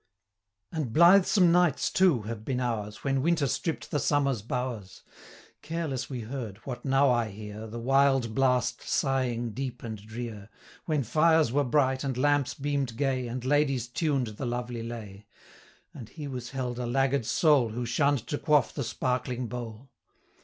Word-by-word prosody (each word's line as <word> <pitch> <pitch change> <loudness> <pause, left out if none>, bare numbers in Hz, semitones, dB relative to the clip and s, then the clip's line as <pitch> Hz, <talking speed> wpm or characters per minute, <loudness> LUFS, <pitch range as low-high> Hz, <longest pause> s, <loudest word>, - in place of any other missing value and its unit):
And 155 -8 -3
blithesome 180 - +6
nights, 175 -4 +2
too, 175 - +3
have 110 0 -6
been 125 +1 -2
ours, 110 -4 -3
When 135 -1 +1
Winter 165 0 +2
stript 160 +5 -3
the 145 - +1
summer's 140 -5 +1
bowers. 115 -4 -5 0.6
Careless 155 -4 -3
we 125 -3 -4
heard, 115 -3 -6
what 125 -3 -6
now 135 0 +3
I 120 -2 +1
hear, 105 +1 -8
185 - - -12
The 120 - -6
wild 135 -4 +3
blast 125 0 +1
sighing 125 -4 0
deep 130 +2 -5
and 110 -3 -6
drear, 110 -2 -7 0.4
When 150 -4 0
fires 160 +1 +3
were 145 +3 +2
bright, 130 0 +1
and 135 -3 -2
lamps 145 0 +2
beam'd 140 -4 -2
gay, 130 -2 0
And 125 +1 -5
ladies 135 -4 +1
tuned 140 0 0
the - - -4
lovely 120 -1 -3
lay; 105 -4 -8 0.7
And 120 -6 -10
he 150 -3 -7
was 125 -3 -6
held 125 -2 -4
a 125 - -2
laggard 135 -1 +1
soul, 145 -8 +3
Who 120 +3 -4
shunn'd 135 +1 +1
to 145 - -2
quaff 150 -4 +2
the 140 - -3
sparkling 125 +1 -2
bowl. 120 +1 -7
130 Hz, 165 wpm, -28 LUFS, 120-140 Hz, 0.7 s, blithesome